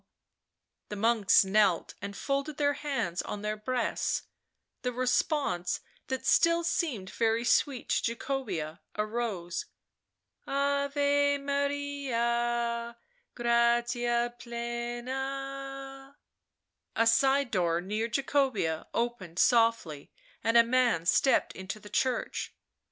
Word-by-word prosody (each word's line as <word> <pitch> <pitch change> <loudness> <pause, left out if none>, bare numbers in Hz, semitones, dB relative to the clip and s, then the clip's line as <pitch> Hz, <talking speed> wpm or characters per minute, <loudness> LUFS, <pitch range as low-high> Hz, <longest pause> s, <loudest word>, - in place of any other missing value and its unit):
The 210 - -4
monks 215 -2 +4
knelt 190 -3 +2
and 200 0 -6
folded 280 +1 -2
their 285 -1 +2
hands 270 - -2
on 205 0 -6
their 210 0 -1
breasts; 245 +3 -1 0.6
the 250 - -1
response 250 - 0 0.3
that 260 0 -3
still 335 +3 +4
seemed 280 - -1
very 225 0 +1
sweet 250 +1 +1
to 230 - +1
Jacobea 200 - -3 0.2
arose: 210 -5 -3 0.4
" - - -48
Ave 285 +1 +2
Maria, 240 -5 -1 0.4
gratia 240 0 +2
plena 270 +3 -5 0.4
" - - -54
A 230 - +3
side 265 +3 +3
door 170 -4 +1
near 210 +5 -2
Jacobea 260 - 0
opened 230 -8 -2
softly 225 - +2 0.3
and 225 +2 +4
a 235 - +8
man 235 -8 +2
stepped 265 +9 +3
into 190 +3 -6
the 205 - -13
church. 260 -2 -1
240 Hz, 105 wpm, -29 LUFS, 215-275 Hz, 0.6 s, a